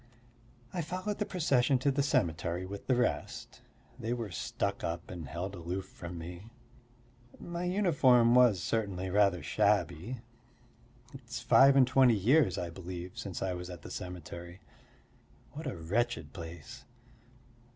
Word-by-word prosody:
I 175 Hz, -, -1 dB
followed 185 Hz, +6 st, -4 dB
the 210 Hz, -, -1 dB
procession 135 Hz, -7 st, +2 dB
to 140 Hz, +3 st, +1 dB
the 140 Hz, +1 st, +1 dB
cemetery 85 Hz, -, 0 dB
with 100 Hz, +1 st, -8 dB
the 130 Hz, -, +3 dB
rest; 115 Hz, -12 st, -2 dB, 0.4 s
they 115 Hz, +2 st, -2 dB
were 115 Hz, -5 st, -4 dB
stuck -, -, -3 dB
up 85 Hz, 0 st, -4 dB
and 85 Hz, -5 st, -7 dB
held 90 Hz, +7 st, -4 dB
aloof 90 Hz, +1 st, -4 dB
from 85 Hz, 0 st, -9 dB
me. 85 Hz, +5 st, -8 dB, 0.9 s
My 170 Hz, +1 st, -4 dB
uniform 145 Hz, -, +4 dB
was 120 Hz, -7 st, +5 dB
certainly 95 Hz, -4 st, -1 dB
rather 100 Hz, -4 st, +3 dB
shabby. 110 Hz, -, 0 dB, 0.9 s
It's 125 Hz, -2 st, -7 dB
five 135 Hz, +1 st, +6 dB
and 135 Hz, -2 st, +7 dB
twenty 130 Hz, -2 st, +5 dB
years, 115 Hz, -, +3 dB
I 85 Hz, -1 st, -3 dB
believe, 90 Hz, 0 st, -7 dB
since 95 Hz, -3 st, -5 dB
I 95 Hz, -1 st, -1 dB
was 90 Hz, 0 st, -6 dB
at 90 Hz, -2 st, -9 dB
the -, -, -9 dB
cemetery; 85 Hz, 0 st, -7 dB, 0.9 s
what 150 Hz, +1 st, -7 dB
a 115 Hz, -, -4 dB
wretched 100 Hz, -1 st, -1 dB
place! 80 Hz, -4 st, -9 dB
100 Hz, 140 wpm, -31 LUFS, 90-130 Hz, 0.9 s, and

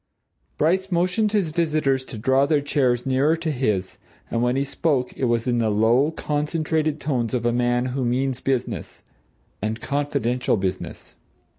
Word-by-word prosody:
Bryce 190 Hz, +5 st, +1 dB
motioned 185 Hz, +5 st, +1 dB
his 200 Hz, -7 st, +1 dB
visitors 155 Hz, -5 st, +1 dB
to 115 Hz, -, -8 dB
draw 130 Hz, +5 st, +2 dB
their 150 Hz, -1 st, +3 dB
chairs 130 Hz, -4 st, +1 dB
nearer 135 Hz, +5 st, +2 dB
to 165 Hz, -1 st, -2 dB
his, 105 Hz, -9 st, -1 dB, 0.3 s
and 115 Hz, -, 0 dB
when 125 Hz, +1 st, +1 dB
he 135 Hz, -, +1 dB
spoke 140 Hz, -2 st, -1 dB
it 130 Hz, -, -1 dB
was 120 Hz, -1 st, +1 dB
in 120 Hz, -1 st, +1 dB
the 110 Hz, -2 st, +1 dB
low, 115 Hz, +7 st, +3 dB
concentrated 155 Hz, 0 st, -1 dB
tones 130 Hz, -5 st, -1 dB
of 120 Hz, -1 st, -2 dB
a 120 Hz, -, +2 dB
man 120 Hz, 0 st, +1 dB
who 135 Hz, -1 st, -1 dB
means 130 Hz, +1 st, 0 dB
business 130 Hz, -2 st, -3 dB, 0.6 s
and 110 Hz, +2 st, -2 dB
confidential 140 Hz, -4 st, 0 dB
business. 95 Hz, -1 st, -4 dB
135 Hz, 160 wpm, -23 LUFS, 120-155 Hz, 0.6 s, their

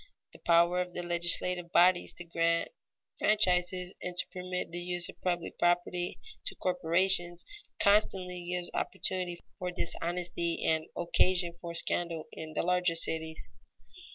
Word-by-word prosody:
The -, -, -13 dB
power 170 Hz, +1 st, +4 dB
of 180 Hz, 0 st, -5 dB
the 175 Hz, -, -4 dB
legislative 175 Hz, 0 st, 0 dB
bodies 180 Hz, 0 st, +4 dB
to 175 Hz, -, -9 dB
grant 170 Hz, 0 st, 0 dB, 0.5 s
franchises 180 Hz, -3 st, +2 dB
and 180 Hz, 0 st, -5 dB
to 180 Hz, -, +1 dB
permit 180 Hz, -1 st, -4 dB
the 175 Hz, -, -3 dB
use 175 Hz, 0 st, -1 dB
of -, -, -13 dB
public 175 Hz, -2 st, -2 dB
property 175 Hz, 0 st, 0 dB, 0.3 s
to -, -, -5 dB
corporations, 175 Hz, 0 st, +4 dB, 0.3 s
constantly 190 Hz, -3 st, +2 dB
gives 180 Hz, 0 st, -3 dB
opportunity 180 Hz, -2 st, -1 dB, 0.2 s
for 180 Hz, -, -2 dB
dishonesty 170 Hz, -1 st, -2 dB
and 160 Hz, 0 st, +1 dB
occasion 175 Hz, 0 st, +2 dB
for 170 Hz, -1 st, -6 dB
scandal 170 Hz, -1 st, -1 dB
in 155 Hz, -1 st, -8 dB
the -, -, -1 dB
larger 180 Hz, -1 st, +1 dB
cities. 160 Hz, -1 st, -1 dB
175 Hz, 135 wpm, -31 LUFS, 170-180 Hz, 0.5 s, power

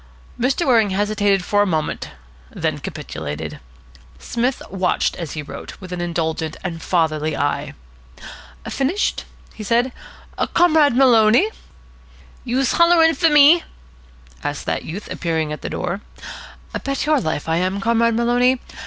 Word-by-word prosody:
Mr. 265 Hz, +7 st, +1 dB
Waring 230 Hz, -6 st, +4 dB
hesitated 205 Hz, -1 st, +1 dB
for 205 Hz, 0 st, +2 dB
a -, -, +3 dB
moment, 160 Hz, -4 st, -2 dB, 0.4 s
then -, -, -2 dB
capitulated. 75 Hz, +1 st, -6 dB, 0.6 s
Psmith 245 Hz, +2 st, -2 dB
watched, 185 Hz, -2 st, 0 dB
as 170 Hz, -4 st, -5 dB
he 150 Hz, -, -5 dB
wrote, -, -, -9 dB
with 185 Hz, -2 st, -8 dB
an 175 Hz, -, -4 dB
indulgent 160 Hz, -2 st, -2 dB
and 165 Hz, -3 st, -4 dB
fatherly 155 Hz, -3 st, 0 dB
eye. 145 Hz, 0 st, -2 dB, 0.9 s
"Finished?" 310 Hz, +10 st, -1 dB, 0.3 s
he 215 Hz, -, -8 dB
said. 240 Hz, +4 st, +1 dB, 0.6 s
"Comrade 315 Hz, -6 st, +4 dB
Maloney." 245 Hz, -, +5 dB, 0.9 s
"Youse 255 Hz, +1 st, 0 dB
hollering 335 Hz, -1 st, +5 dB
fer 330 Hz, -1 st, +3 dB
me?" 295 Hz, +3 st, +6 dB, 0.8 s
asked -, -, -4 dB
that -, -, -2 dB
youth, 195 Hz, +6 st, -7 dB
appearing 160 Hz, -3 st, -2 dB
at 150 Hz, -, -7 dB
the -, -, -5 dB
door. 180 Hz, +3 st, -3 dB, 0.8 s
"Bet 275 Hz, +1 st, -2 dB
your 300 Hz, -3 st, +2 dB
life 155 Hz, -4 st, -3 dB
I 160 Hz, 0 st, +1 dB
am, 185 Hz, +3 st, -1 dB
Comrade 230 Hz, +2 st, +2 dB
Maloney. 245 Hz, +2 st, +2 dB
215 Hz, 135 wpm, -20 LUFS, 170-265 Hz, 0.9 s, me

